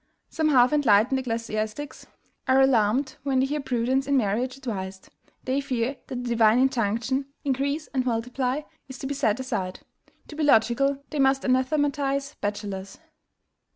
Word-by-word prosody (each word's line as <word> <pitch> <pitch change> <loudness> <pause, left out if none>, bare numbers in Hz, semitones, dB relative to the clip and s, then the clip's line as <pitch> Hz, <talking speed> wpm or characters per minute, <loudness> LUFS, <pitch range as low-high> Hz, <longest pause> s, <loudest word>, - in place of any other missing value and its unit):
"Some 315 -2 0
half 255 -2 +5
enlightened 255 -2 +4
ecclesiastics 230 +2 -4 0.4
are 260 +1 +4
alarmed 260 +1 +2
when 270 -2 0
they 260 - +3
hear 295 +2 -2
prudence 260 0 0
in 280 -1 +3
marriage 245 +3 0
advised; 195 -7 -6 0.3
they 265 +2 0
fear 255 -1 -2
that 250 -1 -5
the 245 - -4
divine 225 -1 +4
injunction 255 +1 0 0.2
INCREASE 280 +3 -1
AND 260 -2 +1
MULTIPLY 250 +4 -1 0.2
is 265 - -8
to - - -7
be 280 - -2
set 230 -4 0
aside. 190 -8 -3 0.5
To 300 - -9
be 315 - -3
logical, 275 +1 +3
they 300 - -3
must 270 0 +3
anathematize 275 +1 0
bachelors." 200 -2 -4
260 Hz, 150 wpm, -25 LUFS, 230-275 Hz, 0.5 s, half